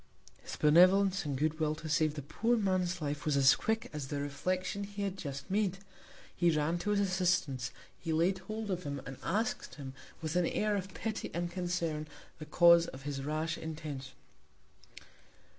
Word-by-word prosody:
His - - -7
Benevolence, 185 +4 +5
and 140 -2 -2
good 155 +2 0
Will 155 -1 +1
to 155 - -8
save 155 -1 +2
the 145 - -5
poor 230 - +1
Man's 185 -4 0
Life, 145 0 -3
was 150 -2 +1
as 135 -1 +7
quick 220 0 -1
as 150 -3 -4
the 145 +1 -3
Reflection 185 +7 -2
he 200 0 -5
had 195 -2 -2
just 140 -4 -6
made! 195 -2 +1 0.6
He 175 - +3
ran 160 +2 +1
to 175 - -3
his 205 -1 +2
Assistance; 180 -9 +1 0.3
he 165 - -3
laid 175 +4 +2
hold 215 +1 -5
of 180 -1 -1
him; 140 -4 -4
and 135 -1 -7
ask'd 210 - -1
him, 135 -3 -7 0.3
with 160 0 -3
an 180 -2 +3
Air 210 0 0
of 195 -1 -3
Pity 220 -1 -3
and 175 0 -2
Concern, 175 -4 -2 0.3
the 155 - -8
Cause 170 +1 +6
of 135 +1 -9
his 140 -1 -3
rash 155 +3 -2
Intention. 150 -4 -6
170 Hz, 180 wpm, -32 LUFS, 150-190 Hz, 0.6 s, as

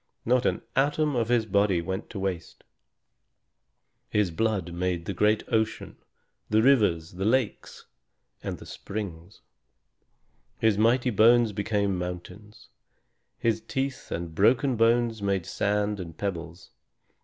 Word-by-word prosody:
Not 125 +1 +3
an - - -1
atom 145 +2 +1
of 115 -2 0
his 120 -2 +2
body 100 -3 +2
went 95 +4 -4
to - - -8
waste. 95 -4 -4 1.5
His 105 -4 +1
blood 95 -2 -1
made 90 -1 -2
the 100 - -3
great 105 +3 +2
ocean, 110 0 -1 0.5
the 110 +1 +3
rivers, 105 -12 +3
lakes, 110 +5 -1 0.6
and - - -4
springs. 95 -3 -7 1.2
His 110 -2 +2
mighty 120 +4 +3
bones 115 +1 +5
became 100 -2 0
mountains. 90 +4 -8 0.7
His 115 -1 0
teeth 135 +4 -4
and 85 -1 -4
broken 120 - +3
bones 115 -1 +2
made 100 -3 0
sand 105 0 -1
and 85 -3 -8
pebbles. 85 -3 -5
105 Hz, 120 wpm, -27 LUFS, 90-115 Hz, 1.5 s, bones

